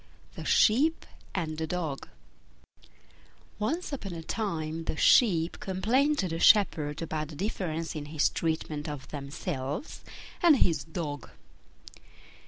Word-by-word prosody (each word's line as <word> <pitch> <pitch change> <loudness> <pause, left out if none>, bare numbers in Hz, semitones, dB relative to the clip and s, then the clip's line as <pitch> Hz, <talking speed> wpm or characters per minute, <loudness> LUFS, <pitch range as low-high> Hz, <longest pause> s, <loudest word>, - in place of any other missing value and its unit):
THE - - -8
SHEEP 290 +9 +3 0.3
AND 160 -4 -2
THE 160 - -2
DOG 160 -5 -3 1.5
Once 305 +10 -2
upon 200 -9 -5
a 165 -1 -6
time 165 -5 -3
the 155 - -3
Sheep 175 -7 +4
complained 235 +11 +1
to 190 - 0
the 165 -1 -3
shepherd 160 -8 +4
about 155 -1 -3
the 155 - -10
difference 165 -3 -3
in 150 -1 -4
his 150 0 +1
treatment 155 -2 -2
of 145 -3 -7
themselves 145 - -5 0.4
and 330 -5 +7
his 160 - +2
Dog. 150 -4 -5
165 Hz, 125 wpm, -29 LUFS, 155-205 Hz, 1.5 s, and